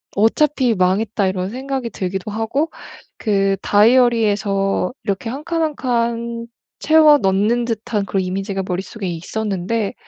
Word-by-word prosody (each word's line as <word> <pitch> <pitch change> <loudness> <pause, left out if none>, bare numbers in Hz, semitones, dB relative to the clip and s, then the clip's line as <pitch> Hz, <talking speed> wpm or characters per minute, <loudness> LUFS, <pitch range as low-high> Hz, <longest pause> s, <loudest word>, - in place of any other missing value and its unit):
'어차피 250 +3 +2
망했다.' 200 +3 +1
이런 185 0 -2
생각이 260 +1 -4
들기도 190 0 -4
하고 225 +9 -1 0.5
그 195 -3 +1
다이어리에서 205 -4 +2
이렇게 200 +3 -2
1 270 +5 -6
칸, 335 -1 -1
1 310 -2 0
칸 235 -2 -2 0.3
채워 310 -1 +6
넣는 210 +3 +1
듯한 225 -2 -2
그런 195 0 -1
이미지가 195 +1 -3
머릿속에 190 +3 -4
있었는데 195 +4 -2
220 Hz, 285 characters per minute, -19 LUFS, 195-240 Hz, 0.5 s, 채워